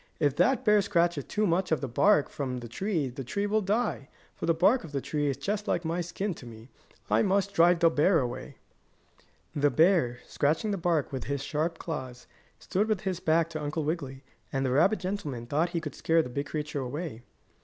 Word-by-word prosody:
"If 145 Hz, -2 st, +2 dB
that 220 Hz, +8 st, +3 dB
bear 210 Hz, -1 st, +5 dB
scratches 170 Hz, -6 st, +1 dB
too 215 Hz, 0 st, 0 dB
much 180 Hz, 0 st, +1 dB
of 160 Hz, -, +2 dB
the 135 Hz, -, -3 dB
bark 150 Hz, -, +3 dB
from 130 Hz, -3 st, -4 dB
the 120 Hz, -1 st, -7 dB
tree 165 Hz, -, -1 dB
the 135 Hz, +2 st, -7 dB
tree 200 Hz, -, -2 dB
will 215 Hz, +1 st, +1 dB
die, 205 Hz, -, -1 dB, 0.3 s
for -, -, -4 dB
the 165 Hz, -, +4 dB
bark 195 Hz, +9 st, +3 dB
of 150 Hz, -4 st, -9 dB
a -, -, +1 dB
tree 145 Hz, +2 st, -2 dB
is 135 Hz, -2 st, -1 dB
just 205 Hz, +9 st, -3 dB
like 170 Hz, -, 0 dB
my 165 Hz, +2 st, -1 dB
skin 175 Hz, +4 st, -3 dB
is 165 Hz, -, -7 dB
to 125 Hz, -, -11 dB
me. 115 Hz, +1 st, -12 dB, 0.4 s
I -, -, +4 dB
must 200 Hz, -1 st, +1 dB
drive 170 Hz, +1 st, +4 dB
the 165 Hz, -, +6 dB
bear 165 Hz, +4 st, +3 dB
away." 125 Hz, -4 st, -4 dB, 1.0 s
The 145 Hz, 0 st, +3 dB
bear, 160 Hz, -7 st, +3 dB
scratching 160 Hz, +9 st, 0 dB
the 200 Hz, -, -1 dB
bark 170 Hz, -4 st, 0 dB
with 130 Hz, -3 st, -4 dB
his 140 Hz, +1 st, -2 dB
sharp 160 Hz, +3 st, -2 dB
claws, 130 Hz, -8 st, -6 dB, 0.3 s
stood 205 Hz, +4 st, -1 dB
with 215 Hz, -4 st, 0 dB
his 185 Hz, -3 st, -2 dB
back 165 Hz, -1 st, +2 dB
to 155 Hz, -2 st, -4 dB
Uncle 150 Hz, +2 st, -2 dB
Wiggily, 145 Hz, -4 st, -4 dB, 0.3 s
and 135 Hz, 0 st, -1 dB
the 130 Hz, -, 0 dB
rabbit 170 Hz, +11 st, +4 dB
gentleman 170 Hz, -10 st, -4 dB
thought 155 Hz, +7 st, 0 dB
he 170 Hz, -, -2 dB
could 150 Hz, -2 st, -6 dB
scare 165 Hz, 0 st, +2 dB
the 125 Hz, -, -7 dB
big 140 Hz, +3 st, -3 dB
creature 150 Hz, -2 st, -3 dB
away. 135 Hz, -1 st, -5 dB
160 Hz, 220 wpm, -28 LUFS, 140-185 Hz, 1.0 s, the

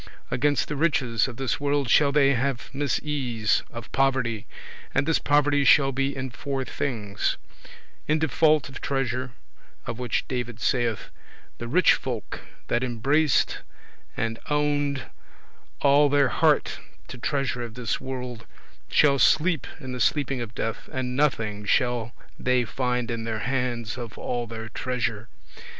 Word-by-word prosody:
Against 145 Hz, +2 st, +1 dB
the 150 Hz, -, -3 dB
riches 135 Hz, -7 st, +1 dB
of 120 Hz, -3 st, -8 dB
this 135 Hz, -3 st, -1 dB
world 145 Hz, -1 st, 0 dB
shall 140 Hz, +3 st, +5 dB
they 140 Hz, -1 st, +4 dB
have 130 Hz, 0 st, -2 dB
misease 135 Hz, -5 st, 0 dB
[trouble, -, -, -22 dB
torment] 115 Hz, -1 st, -8 dB
of -, -, -21 dB
poverty, 130 Hz, -5 st, +1 dB, 0.5 s
and 135 Hz, -, +3 dB
this 165 Hz, -, +2 dB
poverty 145 Hz, 0 st, +3 dB
shall 135 Hz, +1 st, +6 dB
be 135 Hz, +1 st, -1 dB
in 130 Hz, -1 st, -4 dB
four 135 Hz, +3 st, -3 dB
things: 105 Hz, -6 st, -2 dB, 0.7 s
in 155 Hz, -, +3 dB
default 155 Hz, -1 st, +3 dB
[want] 130 Hz, -, -8 dB
of 135 Hz, -, -9 dB
treasure; 130 Hz, -2 st, -2 dB, 0.5 s
of 115 Hz, -, -5 dB
which 125 Hz, -2 st, -1 dB
David 120 Hz, -3 st, -4 dB
saith, 120 Hz, -4 st, 0 dB, 0.5 s
"The 120 Hz, -, -5 dB
rich 175 Hz, +10 st, +5 dB
folk 120 Hz, -5 st, -4 dB, 0.3 s
that 120 Hz, +1 st, +1 dB
embraced 135 Hz, +5 st, +2 dB, 0.6 s
and 115 Hz, 0 st, -2 dB
oned 150 Hz, 0 st, +2 dB
[united] 140 Hz, -2 st, -3 dB, 0.7 s
all 145 Hz, +1 st, +5 dB
their 140 Hz, -2 st, +4 dB
heart -, -, +2 dB, 0.3 s
to 130 Hz, -, -8 dB
treasure 130 Hz, +1 st, -1 dB
of 115 Hz, -1 st, -6 dB
this 120 Hz, -2 st, -2 dB
world, 125 Hz, -3 st, -6 dB, 0.4 s
shall 140 Hz, -2 st, +4 dB
sleep 160 Hz, +2 st, +3 dB
in 130 Hz, -4 st, -7 dB
the 125 Hz, -, -4 dB
sleeping 135 Hz, 0 st, +1 dB
of 115 Hz, -1 st, -6 dB
death, 115 Hz, 0 st, -4 dB
and 125 Hz, -1 st, -3 dB
nothing 110 Hz, -8 st, 0 dB
shall 120 Hz, +1 st, +1 dB, 0.2 s
they 125 Hz, -1 st, +2 dB
find 125 Hz, -1 st, -1 dB
in 115 Hz, -1 st, -3 dB
their 115 Hz, -1 st, -2 dB
hands 125 Hz, -3 st, -2 dB
of 115 Hz, -3 st, -7 dB
all 120 Hz, -1 st, -3 dB
their 110 Hz, 0 st, -6 dB
treasure." 120 Hz, -2 st, -3 dB
130 Hz, 155 wpm, -25 LUFS, 120-140 Hz, 0.7 s, shall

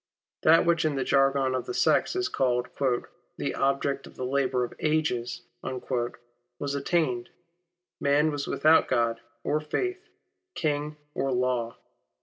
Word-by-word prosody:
That 165 Hz, +2 st, +6 dB
which 170 Hz, -1 st, +3 dB
in 155 Hz, -2 st, +1 dB
the 135 Hz, -, 0 dB
jargon 135 Hz, -1 st, +3 dB
of 130 Hz, -, -2 dB
the 380 Hz, -, -4 dB
sect -, -, +3 dB
is 375 Hz, 0 st, +1 dB
called 125 Hz, -1 st, 0 dB
^' 130 Hz, -3 st, +1 dB, 0.3 s
the -, -, -2 dB
object 140 Hz, 0 st, 0 dB
of -, -, -15 dB
the 130 Hz, -, -4 dB
labour 130 Hz, -1 st, +1 dB
of 120 Hz, -, -4 dB
ages," 150 Hz, -6 st, 0 dB, 0.2 s
was 120 Hz, +1 st, -5 dB
attained. 140 Hz, -4 st, 0 dB, 0.7 s
Man 145 Hz, +2 st, +3 dB
was 145 Hz, -1 st, -3 dB
without 155 Hz, +1 st, +4 dB
God 115 Hz, -1 st, +1 dB, 0.2 s
or 150 Hz, -, +1 dB
Faith, 370 Hz, -, -3 dB, 0.5 s
King 150 Hz, -1 st, -1 dB, 0.2 s
or 135 Hz, -, -1 dB
Law. 125 Hz, -2 st, 0 dB
135 Hz, 140 wpm, -27 LUFS, 125-150 Hz, 0.7 s, That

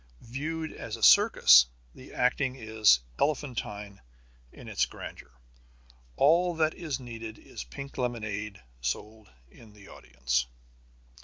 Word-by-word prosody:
Viewed 155 Hz, +6 st, -4 dB
as 115 Hz, -1 st, -6 dB
a 115 Hz, -, -9 dB
circus, 65 Hz, -9 st, +7 dB, 0.3 s
the -, -, -14 dB
acting 130 Hz, +1 st, 0 dB
is 110 Hz, -, +3 dB, 0.2 s
elephantine 110 Hz, -9 st, -3 dB, 0.5 s
in -, -, -13 dB
its -, -, 0 dB
grandeur. -, -, -10 dB, 0.9 s
All 170 Hz, +4 st, +3 dB
that 160 Hz, -1 st, +1 dB
is 150 Hz, -6 st, -4 dB
needed 115 Hz, -3 st, -8 dB
is 60 Hz, -, -9 dB
pink 140 Hz, -, -9 dB
lemonade 105 Hz, -4 st, -3 dB, 0.2 s
sold 105 Hz, -, -5 dB, 0.2 s
in 110 Hz, -3 st, -17 dB
the 105 Hz, -1 st, -16 dB
audience. 60 Hz, -1 st, -2 dB
115 Hz, 115 wpm, -28 LUFS, 100-140 Hz, 0.9 s, circus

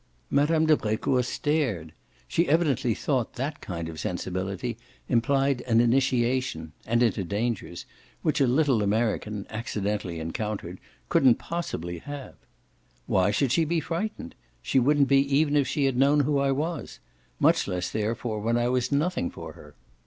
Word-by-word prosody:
Mme. 155 Hz, +3 st, +3 dB
de 155 Hz, -1 st, +5 dB
Brecourt 115 Hz, +2 st, 0 dB
stared; 125 Hz, -, -1 dB, 0.3 s
she 170 Hz, +1 st, +1 dB
evidently 140 Hz, -8 st, +2 dB
thought 130 Hz, -6 st, -1 dB
that 140 Hz, +4 st, -4 dB
kind 85 Hz, -3 st, -5 dB
of 80 Hz, -1 st, -7 dB
sensibility 95 Hz, +7 st, -3 dB, 0.3 s
implied 135 Hz, +2 st, +2 dB
an 115 Hz, -1 st, +4 dB
initiation 125 Hz, -7 st, +1 dB, 0.2 s
and 120 Hz, +2 st, +3 dB
into 110 Hz, -4 st, +1 dB
dangers 100 Hz, -2 st, -3 dB, 0.4 s
which 155 Hz, -2 st, +1 dB
a 135 Hz, -, +4 dB
little 130 Hz, -3 st, +3 dB
American 105 Hz, -1 st, -1 dB
accidentally 105 Hz, -5 st, -3 dB
encountered 90 Hz, +2 st, -4 dB, 0.3 s
couldn't 130 Hz, -3 st, +5 dB
possibly 85 Hz, -, -4 dB
have. 145 Hz, +2 st, -8 dB, 0.7 s
"Why 95 Hz, +1 st, +2 dB
should 125 Hz, +5 st, +1 dB
she 165 Hz, +5 st, +3 dB
be 165 Hz, +2 st, 0 dB
frightened? 170 Hz, -, -4 dB, 0.3 s
She 135 Hz, -, +2 dB
wouldn't 140 Hz, +2 st, +3 dB
be 135 Hz, 0 st, +5 dB, 0.2 s
even 150 Hz, -1 st, +2 dB
if 140 Hz, -2 st, +3 dB
she 140 Hz, +1 st, 0 dB
had 135 Hz, -2 st, +1 dB
known 140 Hz, +3 st, +4 dB
who 145 Hz, 0 st, +1 dB
I 140 Hz, 0 st, +2 dB
was; 155 Hz, +4 st, -3 dB, 0.4 s
much -, -, +3 dB
less 90 Hz, -1 st, -2 dB
therefore 110 Hz, +1 st, -2 dB
when 115 Hz, +3 st, +1 dB
I 120 Hz, 0 st, +1 dB
was 125 Hz, +1 st, 0 dB
nothing 150 Hz, -, 0 dB
for -, -, -9 dB
her." 75 Hz, -1 st, -15 dB
125 Hz, 155 wpm, -26 LUFS, 105-145 Hz, 0.7 s, de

